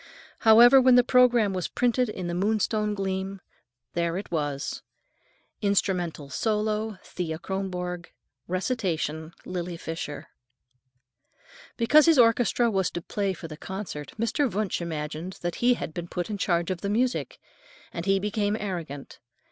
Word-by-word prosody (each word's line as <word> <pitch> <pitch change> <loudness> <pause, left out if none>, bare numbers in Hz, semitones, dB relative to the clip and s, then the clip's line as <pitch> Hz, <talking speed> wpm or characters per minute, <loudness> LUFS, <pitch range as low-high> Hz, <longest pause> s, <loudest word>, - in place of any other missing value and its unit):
However, 240 +4 +8
when 255 -1 +6
the 245 - +7
programme 245 -5 +4
was 185 -3 -2
printed 245 0 +1
in 185 -4 -5
the 175 - -3
Moonstone 210 +2 0
Gleam, 195 0 -3 0.5
there 170 0 0
it 200 - -7
was: 145 -4 -2 0.8
"Instrumental 180 -7 0
solo, 215 0 -1
Thea 165 -3 -4
Kronborg. 180 -1 -4 0.4
Recitation, 170 - -2
Lily 175 -1 -4
Fisher." 165 -3 -6 1.5
Because 295 +7 +5
his 325 -3 +6
orchestra 235 0 +4
was 190 -3 +1
to 175 - -5
play 200 0 -1
for 165 - -8
the 155 -1 -9
concert, 190 -5 -6
Mr. 230 +3 0
Wunsch 205 -3 -1
imagined 160 +2 -4
that 175 -1 -2
he 245 +1 +5
had 160 - -6
been 175 +1 -5
put 175 +4 -4
in 205 - -4
charge 175 -1 +1
of 180 - -4
the 200 - -2
music, 245 +4 0 0.6
and 170 +3 -5
he 195 0 +4
became 205 +1 -1
arrogant. 165 -8 -6
190 Hz, 140 wpm, -26 LUFS, 170-220 Hz, 1.5 s, However